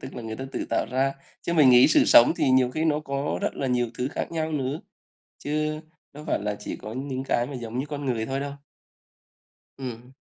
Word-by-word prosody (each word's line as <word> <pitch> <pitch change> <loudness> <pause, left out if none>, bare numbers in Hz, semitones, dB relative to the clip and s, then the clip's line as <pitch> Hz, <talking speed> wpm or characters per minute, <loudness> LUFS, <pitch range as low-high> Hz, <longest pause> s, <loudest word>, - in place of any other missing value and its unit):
Tức 130 - -9
là 120 - -6
người 110 -1 -5
ta 130 - -5
tự - - -3
tạo - - -1
ra. 135 +2 +1 0.3
Chứ - - -2
mình 150 -6 +6
nghĩ 125 0 +7
sự - - +5
sống 120 - +7
thì 135 - +2
nhiều 130 -1 +4
khi 155 +5 -2
nó 150 -2 +2
có 140 -1 -2
rất - - -1
là 135 - -2
nhiều 125 -1 +1
thứ 125 - 0
khác - - -3
nhau 160 -1 -2
nữa, 140 0 -2 0.6
chứ 155 +1 -2 0.3
đâu 150 +1 -10
phải - - +1
là 105 0 -1
chỉ - - -6
có 105 - -8
những 130 +1 -4
cái 120 -2 +1
mà 140 - -8
giống 120 -1 -5
như 135 - -2
con 145 -1 -5
người 115 -4 -1
thôi 135 +2 -2
đâu. 140 0 -4 1.3
Ừm. 125 -1 -8
135 Hz, 235 wpm, -25 LUFS, 125-145 Hz, 1.3 s, nghĩ